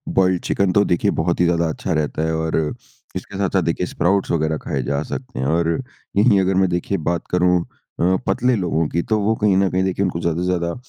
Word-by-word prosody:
Boiled 95 -2 +3
chicken 100 -2 +1
तो 100 +2 +4
देखिए 85 - +1
बहुत 85 +2 0
ही 90 - +4
ज़्यादा 85 -1 +2
अच्छा 85 +2 -3
रहता 75 0 -1
है 80 0 0
और 80 0 -1 0.6
इसके 100 - -6
साथ-साथ 95 -1 +1
देखिए 85 +2 -1
स्प्राउट्स 95 +2 0
वग़ैरह 80 -1 0
खाए 65 - -2
जा 70 +3 -1
सकते 130 +7 -6
हैं। 65 - -1
और 85 +1 +1 0.5
यहीं 105 -1 +5
अगर 95 0 +1
मैं 95 -1 +3
देखिए 90 +3 -1
बात 85 +1 -1
करूँ 90 0 +3 0.4
अ, 90 +2 +3
पतले 125 0 +2
लोगों 85 -5 0
की 85 - 0
तो 110 -1 +2
वो 105 +2 +2
कहीं 100 -3 +3
न 95 -1 +3
कहीं 95 +1 +1
देखिए 95 +1 0
उनको 85 -2 -2
ज़्यादा 85 +1 -1
से - - -1
ज़्यादा 85 -2 0
90 Hz, 225 wpm, -20 LUFS, 85-95 Hz, 0.6 s, यहीं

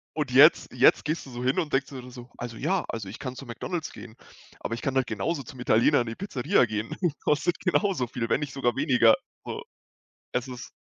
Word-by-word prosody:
und 150 -4 -1
jetzt 140 +6 +6
jetzt 125 +1 +4
gehst 155 +2 -2
du 135 - -11
so 120 +1 -5
hin 130 +1 +1
und 155 -4 -3
denkst 135 0 +2
dir 130 -2 -9
so: 120 0 -11
„Also 120 -1 -6
ja 190 +10 0
also 105 -4 -5
ich 105 - -8
kann 130 -1 -6
zu 135 - -9
McDonald's 155 +8 -4
gehen, 115 -1 -11 0.4
aber 115 - -3
ich 115 - -9
kann 135 -1 -1
halt 130 -1 +2
genauso 145 +8 -2
zum 130 0 -11
Italiener 125 +3 +4
in 120 - -4
die 115 - -3
Pizzeria 135 -10 +1
gehen. 110 0 -4 0.3
Kostet 160 +3 +1
genauso 185 -6 +1
viel, 115 0 -4
wenn - - +2
nicht 145 -2 -4
sogar 120 -3 0
weniger“, 125 -5 +5 0.3
so, - - -6 0.7
es 125 +1 -1
ist 125 -1 -8
130 Hz, 220 wpm, -27 LUFS, 120-145 Hz, 0.7 s, jetzt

